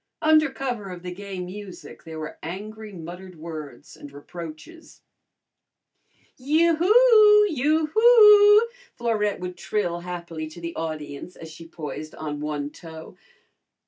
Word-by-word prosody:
Under 310 -1 +4
cover 245 -7 -5
of 180 -1 -9
the 180 0 -6
gay 195 0 -8
music 185 +1 -9
there 160 -1 -8
were 155 0 -7
angry 210 +6 -8
muttered 180 +1 -10
words 155 -3 -9
and 145 - -12
reproaches. 165 - -11 1.3
"Yoo 315 +6 +2
hoo! 425 +2 +6
Yoo 310 -1 +1
hoo!" 425 -2 +7 0.3
Florette 215 -3 -1
would 180 0 -6
trill 175 -2 -2
happily 170 -2 -6
to 155 +2 -12
the 170 0 -6
audience 155 +1 -6
as 160 -1 -11
she 165 +1 -12
poised 155 -1 -8
on 150 -2 -5
one 150 -1 -4
toe. 160 -1 -12
180 Hz, 130 wpm, -24 LUFS, -, 1.3 s, hoo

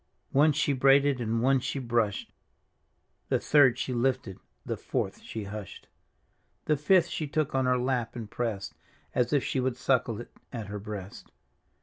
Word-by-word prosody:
One 150 +3 +5
she 145 0 +1
braided 135 0 +4
and 115 0 0
one 135 +1 +4
she 135 +2 -3
brushed. 115 -5 -1 1.0
The - - +2
third 130 -5 +5
she 130 - -2
lifted, 120 -5 -1 0.3
the - - -2
fourth - - -3
she 110 - -6
hushed. 100 -1 -8 0.8
The 155 - +3
fifth 170 +4 +4
she 160 -2 -3
took 155 0 -1
on 130 -1 +1
her 125 0 +3
lap 125 -2 -1
and 115 -3 -5
pressed. 105 -4 -3 0.4
As 125 -1 +1
if 145 -3 +2
she 130 - -1
would 125 -1 -1
suckle 125 -4 +1
it 120 - -9 0.2
at 115 -4 -5
her 105 0 -5
breast. 100 -2 -8
125 Hz, 165 wpm, -28 LUFS, 115-135 Hz, 1.0 s, One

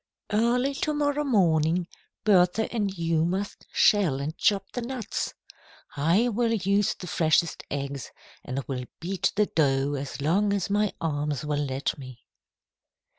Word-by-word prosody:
Early 245 +5 +2
to 300 +2 -1
morrow 295 0 +1
morning, 170 - +3
you 180 - -1
and 170 - -24 0.3
Bertha 225 +3 -2 0.4
must 190 +4 -3
shell 185 -10 +3
and 150 +3 -4
chop 195 0 +1
the 245 - -4
nuts. 245 -1 -4 0.6
I 170 +11 +3
will 230 +1 +1
use 200 -1 +1
the - - -9
freshest 165 -1 +1
eggs 140 -2 -4 0.3
and 135 +2 -4
will 125 -2 -3
beat 185 +2 -1
the 210 +1 +3
dough 140 -5 +1
as 140 0 -5
long 195 +8 +2
as 200 -1 -1
my 210 0 +2
arms 150 -2 -2
will 145 -1 0
let 135 +2 -2
me." 130 -3 -11
175 Hz, 145 wpm, -26 LUFS, 145-210 Hz, 0.6 s, morning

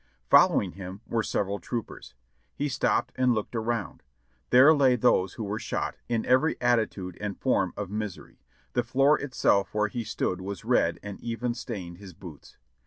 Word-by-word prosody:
Following - - +5
him 95 +3 -9
were 115 - -1
several 100 -1 -2
troopers. 115 - -6 0.4
He 145 +1 -2
stopped 135 0 0
and 125 -2 +3
looked 110 +2 -4
around; 115 -2 -2 0.5
there 130 +5 +7
lay 135 -4 +4
those 110 -6 +2
who 115 - -5
were 105 +1 -3
shot, - - -3
in 115 -2 0
every 130 +6 +2
attitude 110 -7 0
and 105 -2 -4
form - - +1
of 100 -2 -5
misery; 105 -3 -6 0.3
the 120 - +2
fioor 135 +5 +3
itself 100 -8 +1
where 105 -1 +1
he 120 0 -4
stood 95 -4 -2
was 100 -1 -6
red - - +2
and 100 -1 -7
even 120 +1 -3
stained 95 -8 -7
his 95 -3 -11
boots. 80 -6 -12
110 Hz, 170 wpm, -27 LUFS, 100-125 Hz, 0.5 s, there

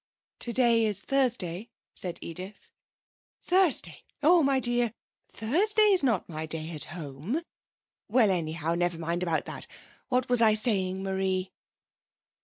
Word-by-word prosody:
'Today 235 -1 +2
is 210 -3 +1
Thursday,' 235 -7 0 0.2
said 180 -2 -3
Edith. 185 +5 -8 0.7
'Thursday! 345 - +1 0.2
Oh, 340 +3 +6
my 275 -2 +2
dear. 240 -2 0 0.4
Thursday's 400 - +3
not 235 -9 0
my 160 -1 -5
day 160 +1 -4
at 155 -3 +1
home. 165 - -5 0.6
Well, 220 -2 +4
anyhow, 165 -2 -1
never 175 0 0
mind 170 +2 -2
about 165 -3 -1
that. - - -6 0.4
What 255 0 +1
was 245 -1 +2
I 215 -2 +5
saying, 190 -4 0
Marie?' 190 -1 -1
205 Hz, 125 wpm, -28 LUFS, 170-250 Hz, 0.7 s, Oh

